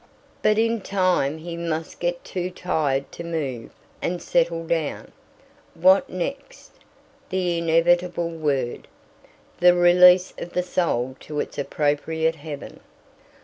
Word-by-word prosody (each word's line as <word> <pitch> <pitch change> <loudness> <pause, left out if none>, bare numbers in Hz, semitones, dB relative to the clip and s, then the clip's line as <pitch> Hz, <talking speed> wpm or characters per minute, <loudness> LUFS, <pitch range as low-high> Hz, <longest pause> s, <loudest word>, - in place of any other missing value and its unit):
But 215 0 +3
in 230 0 +1
time 185 -7 +1
he 170 +1 -7
must 165 -1 -4
get 175 0 -2
too 180 -1 -4
tired 150 -7 -1
to 170 - -8
move, 145 -8 -4 0.3
and 175 0 -2
settle 165 -1 0
down. 160 -3 -2 0.6
What 185 +4 +4
next? 185 +10 -6 0.6
The 180 -2 0
inevitable 170 +1 +2
word. 145 -6 -2 0.7
The 180 0 +6
release 180 +1 +6
of 175 - -7
the 180 - 0
soul 130 -8 -1
to 150 -1 -6
its - - -4
appropriate 155 +3 0
Heaven. 145 -1 -8
170 Hz, 120 wpm, -23 LUFS, 155-180 Hz, 0.7 s, The